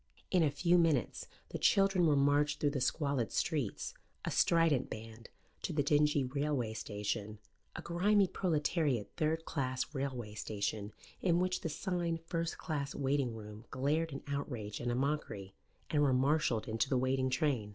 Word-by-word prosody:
In 180 Hz, -, +4 dB
a 155 Hz, -, +4 dB
few 175 Hz, +4 st, +3 dB
minutes 155 Hz, -, +1 dB, 0.2 s
the -, -, -4 dB
children 195 Hz, -3 st, +4 dB
were 150 Hz, -, +4 dB
marched 145 Hz, +1 st, +3 dB
through 145 Hz, -, +2 dB
the 140 Hz, -2 st, -2 dB
squalid 140 Hz, -4 st, 0 dB
streets, 145 Hz, -, -1 dB, 0.3 s
a -, -, -1 dB
strident 165 Hz, -6 st, +3 dB
band, 110 Hz, +1 st, -9 dB, 0.3 s
to 175 Hz, -, -3 dB
the 145 Hz, -1 st, +2 dB
dingy 150 Hz, 0 st, +3 dB
railway 135 Hz, -3 st, -1 dB
station, 105 Hz, 0 st, -3 dB, 0.4 s
a -, -, -6 dB
grimy 195 Hz, +4 st, +3 dB
proletariat 155 Hz, -, 0 dB
third 160 Hz, 0 st, 0 dB
class 130 Hz, -1 st, -2 dB
railway 130 Hz, -6 st, -3 dB
station 105 Hz, 0 st, -3 dB, 0.3 s
in 170 Hz, -2 st, +3 dB
which 185 Hz, 0 st, 0 dB
the 165 Hz, -, -2 dB
sign 170 Hz, 0 st, -1 dB
"First 165 Hz, 0 st, -2 dB
Class 145 Hz, -4 st, -3 dB
Waiting 135 Hz, -3 st, 0 dB
Room" 105 Hz, +1 st, -9 dB
glared 150 Hz, +5 st, 0 dB
an 135 Hz, -, -6 dB
outrage 125 Hz, -7 st, -4 dB
and 120 Hz, 0 st, -1 dB
a -, -, 0 dB
mockery, 130 Hz, -8 st, -2 dB, 0.4 s
and 150 Hz, -, +3 dB
were 140 Hz, -3 st, +4 dB
marshalled 130 Hz, -3 st, +2 dB
into 110 Hz, +4 st, 0 dB
the 130 Hz, -, +2 dB
waiting 130 Hz, +1 st, +1 dB
train. 130 Hz, -7 st, 0 dB
140 Hz, 160 wpm, -34 LUFS, 120-160 Hz, 0.4 s, In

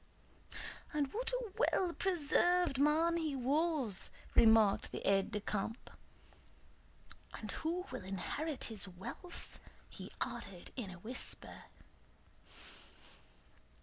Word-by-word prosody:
"And 285 Hz, -2 st, 0 dB
what 465 Hz, +2 st, -1 dB
a -, -, -2 dB
well 370 Hz, -7 st, +2 dB
preserved 350 Hz, -3 st, +3 dB
man 320 Hz, +4 st, +4 dB
he 315 Hz, -4 st, -1 dB
was!" 275 Hz, -, +1 dB, 0.2 s
remarked 220 Hz, -3 st, +6 dB
the -, -, -4 dB
aide 195 Hz, -1 st, +3 dB
de 210 Hz, -1 st, -2 dB
camp. 210 Hz, +2 st, -3 dB, 1.4 s
"And -, -, -5 dB
who 345 Hz, +3 st, -2 dB
will 255 Hz, -, -5 dB
inherit 260 Hz, -, -3 dB
his 205 Hz, -4 st, -1 dB
wealth?" 190 Hz, -, -8 dB, 0.3 s
he -, -, -8 dB
added 185 Hz, -3 st, -4 dB
in 235 Hz, -7 st, -3 dB
a 185 Hz, -, -7 dB
whisper. 230 Hz, +8 st, -2 dB
280 Hz, 105 wpm, -36 LUFS, 210-340 Hz, 1.4 s, remarked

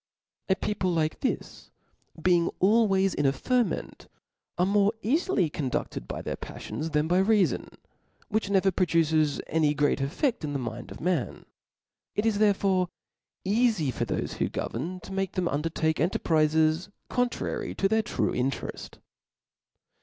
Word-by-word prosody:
A 190 Hz, -, +4 dB
people 195 Hz, -2 st, -1 dB
like 160 Hz, -3 st, 0 dB
this -, -, -3 dB, 0.5 s
being 170 Hz, 0 st, +3 dB
always 195 Hz, -2 st, +3 dB
in 145 Hz, -, +1 dB
a -, -, +4 dB
ferment, 245 Hz, -, -1 dB, 0.5 s
are 180 Hz, -, +3 dB
more 200 Hz, +2 st, +3 dB
eafily 235 Hz, -, +1 dB
conduced 130 Hz, -, -3 dB
by -, -, -5 dB
their -, -, -3 dB
paflions 160 Hz, +1 st, -6 dB
than 150 Hz, +1 st, +2 dB
by 180 Hz, +2 st, +3 dB
rea* 205 Hz, 0 st, +4 dB
fon, -, -, -4 dB, 0.6 s
which 220 Hz, -1 st, -1 dB
hever 195 Hz, -1 st, +3 dB
produces 160 Hz, -4 st, +2 dB
any 150 Hz, -2 st, +1 dB
great 145 Hz, -1 st, +2 dB
effeft 175 Hz, -, -1 dB
in 145 Hz, -1 st, -3 dB
the -, -, 0 dB
mind 120 Hz, -1 st, -5 dB
of -, -, -9 dB
man; 170 Hz, -7 st, -1 dB, 0.7 s
it 210 Hz, -, 0 dB
is 215 Hz, -2 st, +2 dB
therefore 195 Hz, -3 st, +3 dB, 0.6 s
cafy 205 Hz, -, +2 dB
for 120 Hz, -, -1 dB
thofe 105 Hz, -, -3 dB
who -, -, 0 dB
govern, 170 Hz, +10 st, -4 dB
to 195 Hz, -, -9 dB
make 195 Hz, -1 st, -1 dB
them 185 Hz, -2 st, 0 dB
undertake 160 Hz, +1 st, 0 dB
cntefprizes 160 Hz, +1 st, +2 dB, 0.2 s
con^ 245 Hz, -1 st, +1 dB
trary -, -, -4 dB
to 195 Hz, -, +3 dB
their 220 Hz, +2 st, +2 dB
true -, -, -1 dB
intereft. 130 Hz, +2 st, -3 dB
180 Hz, 150 wpm, -27 LUFS, 155-200 Hz, 0.7 s, A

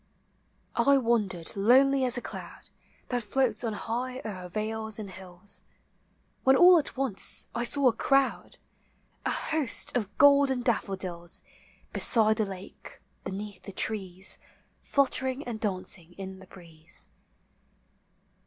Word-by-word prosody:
I 280 Hz, 0 st, +4 dB
wandered 210 Hz, -9 st, 0 dB
lonely 260 Hz, +6 st, +4 dB
as 250 Hz, 0 st, +2 dB
a 245 Hz, -, -4 dB
cloud -, -, -9 dB, 0.4 s
That 245 Hz, -1 st, 0 dB
floats 235 Hz, 0 st, 0 dB
on 225 Hz, -2 st, -1 dB
high 245 Hz, +4 st, -3 dB
o'er 185 Hz, -4 st, -6 dB
vales 220 Hz, +2 st, -4 dB
and 205 Hz, -3 st, -7 dB
hills, 185 Hz, +1 st, -6 dB, 0.8 s
When 265 Hz, 0 st, +5 dB
all 355 Hz, +2 st, +8 dB
at 290 Hz, -, -4 dB
once 265 Hz, -8 st, +1 dB
I 235 Hz, -, -1 dB
saw 275 Hz, +2 st, +2 dB
a 240 Hz, -, +4 dB
crowd, 275 Hz, +1 st, +1 dB, 0.4 s
— -, -, -39 dB
A -, -, +1 dB
host 310 Hz, -7 st, +1 dB
of 205 Hz, -4 st, -2 dB
golden 280 Hz, -3 st, +5 dB
daffodils 185 Hz, -7 st, -2 dB, 0.5 s
Beside 220 Hz, -2 st, +4 dB
the 215 Hz, -, +1 dB
lake, 190 Hz, -1 st, -10 dB, 0.3 s
beneath 200 Hz, 0 st, -6 dB
the 200 Hz, -, -9 dB
trees. 190 Hz, -2 st, -2 dB, 0.4 s
Fluttering 265 Hz, -1 st, 0 dB
and 230 Hz, -3 st, -5 dB
dancing 185 Hz, -4 st, -2 dB
in 190 Hz, 0 st, -8 dB
the 190 Hz, -, -14 dB
breeze. 165 Hz, -4 st, -8 dB
220 Hz, 130 wpm, -28 LUFS, 190-255 Hz, 0.8 s, all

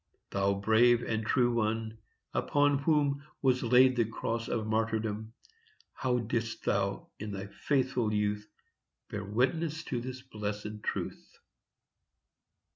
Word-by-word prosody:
Thou 100 Hz, 0 st, +2 dB
brave 115 Hz, +4 st, +4 dB
and 110 Hz, -1 st, -1 dB
true 120 Hz, +2 st, +2 dB
one, 110 Hz, -1 st, -1 dB, 0.3 s
upon 145 Hz, -1 st, +2 dB
whom 145 Hz, -1 st, +2 dB, 0.2 s
Was 130 Hz, -1 st, +3 dB
laid 125 Hz, +2 st, +5 dB
the 120 Hz, -, +3 dB
Cross 115 Hz, +1 st, -3 dB
of 110 Hz, -3 st, -1 dB
Martyrdom, 110 Hz, 0 st, -1 dB, 0.6 s
How 125 Hz, -1 st, 0 dB
didst 115 Hz, -1 st, -2 dB
thou, 100 Hz, 0 st, 0 dB
in 105 Hz, 0 st, -5 dB
thy 95 Hz, 0 st, -4 dB
faithful 130 Hz, 0 st, 0 dB
youth, 105 Hz, 0 st, -1 dB, 0.6 s
Bear 105 Hz, 0 st, -3 dB
witness 150 Hz, -, 0 dB
to 125 Hz, -5 st, -3 dB
this 130 Hz, +1 st, -6 dB
blessed 105 Hz, 0 st, -5 dB
truth! -, -, -4 dB
115 Hz, 120 wpm, -31 LUFS, 105-130 Hz, 0.6 s, laid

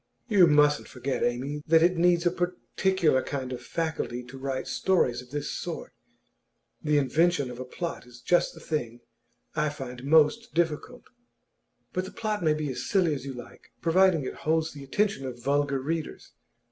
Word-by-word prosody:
'You 200 Hz, -7 st, +6 dB
mustn't 150 Hz, -1 st, +4 dB
forget, 130 Hz, +1 st, -3 dB
Amy, 135 Hz, +5 st, -1 dB
that 160 Hz, 0 st, +6 dB
it 180 Hz, +2 st, +4 dB
needs 175 Hz, 0 st, +3 dB
a 175 Hz, -, +4 dB
particular 180 Hz, -3 st, +1 dB
kind 130 Hz, -2 st, -4 dB
of 125 Hz, -, -6 dB
faculty 155 Hz, -4 st, -3 dB
to 125 Hz, +2 st, -11 dB
write 135 Hz, -1 st, -3 dB
stories 130 Hz, -10 st, +1 dB
of 125 Hz, -, -16 dB
this 145 Hz, +1 st, -3 dB
sort. -, -, -5 dB, 0.9 s
The 150 Hz, -1 st, +2 dB
invention 145 Hz, 0 st, +2 dB
of 125 Hz, -, -9 dB
a 130 Hz, -, -5 dB
plot 165 Hz, 0 st, -5 dB
is 125 Hz, 0 st, -14 dB
just 175 Hz, +10 st, +2 dB
the -, -, -11 dB
thing 120 Hz, -8 st, -3 dB, 0.5 s
I 150 Hz, -, +1 dB
find 130 Hz, -3 st, -7 dB
most 160 Hz, -, +3 dB
difficult.' 170 Hz, +9 st, -1 dB, 0.9 s
'But 185 Hz, +1 st, -1 dB
the -, -, -8 dB
plot 215 Hz, -3 st, -2 dB
may 155 Hz, -2 st, +3 dB
be 150 Hz, -2 st, -2 dB
as 125 Hz, -, -5 dB
silly 185 Hz, -6 st, +3 dB
as 135 Hz, -2 st, -5 dB
you 135 Hz, -, -4 dB
like, 125 Hz, -, -12 dB
providing 170 Hz, -1 st, +4 dB
it -, -, -4 dB
holds 160 Hz, 0 st, 0 dB
the 145 Hz, -2 st, -9 dB
attention 195 Hz, +1 st, 0 dB
of 125 Hz, -2 st, -6 dB
vulgar 140 Hz, 0 st, +1 dB
readers. 160 Hz, +4 st, -4 dB
150 Hz, 175 wpm, -27 LUFS, 130-175 Hz, 0.9 s, You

